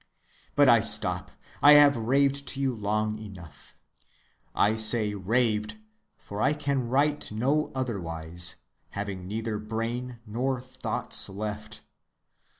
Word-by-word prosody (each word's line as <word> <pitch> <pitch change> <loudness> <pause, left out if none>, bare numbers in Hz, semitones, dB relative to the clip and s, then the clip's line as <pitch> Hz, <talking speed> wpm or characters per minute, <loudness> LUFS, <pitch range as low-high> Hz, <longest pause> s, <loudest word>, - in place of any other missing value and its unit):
But 145 -1 +5
I 120 -2 +6
stop. - - +4 0.3
I 145 +1 +8
have 145 -1 +7
raved 140 +4 0
to 135 - -2
you 135 -2 0
long 105 0 -2
enough. 90 -9 -13 0.8
I 105 - +3
say 110 -1 +3
raved, 105 - -1 0.4
for 100 +1 -7
I 140 - +3
can 140 -4 -2
write 145 +3 0
no 135 +8 0
otherwise, 85 -8 -3 0.4
having 100 -3 -5
neither 110 +1 -4
brain 115 +3 -4
nor 125 +4 -2
thoughts 130 +1 -2
left. 105 +2 -6
110 Hz, 120 wpm, -27 LUFS, 105-130 Hz, 0.8 s, I